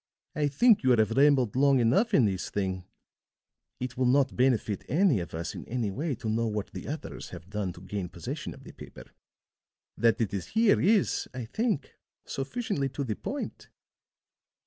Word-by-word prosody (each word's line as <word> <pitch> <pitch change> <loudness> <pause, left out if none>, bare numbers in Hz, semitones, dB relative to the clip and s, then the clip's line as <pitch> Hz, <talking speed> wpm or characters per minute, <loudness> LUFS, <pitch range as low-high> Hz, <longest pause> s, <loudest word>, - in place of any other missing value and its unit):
"I 150 -1 +1
think 215 - +4
you 130 - +2
have 110 -3 +4
rambled 135 -3 +4
long 140 0 +4
enough 130 - +3
in 125 - +5
this 95 -3 -1
thing. 95 -2 -2 0.9
It 125 -1 -4
will 130 -1 +2
not 135 +2 +3
benefit 125 -5 +1
any 160 - +3
of 85 -2 -6
us 85 +1 -4
in - - -7
any 115 -4 -2
way 145 - -2
to 110 - -7
know 115 +1 +1
what 105 -2 -3
the - - -7
others - - -6
have 90 +3 -11
done 105 -3 -2
to 90 - -13
gain 95 -1 -4
possession - - -6
of - - -15
the - - -11
paper. - - -12 0.8
That 115 0 +3
it 110 -5 -1
is 95 -3 -3
here 225 -2 +5
is, 205 0 +2
I 125 -2 -4
think, 215 - -1 0.3
sufficiently 145 - -2
to 135 +2 -4
the 110 -5 -2
point." - - -6
125 Hz, 180 wpm, -28 LUFS, 105-145 Hz, 0.9 s, in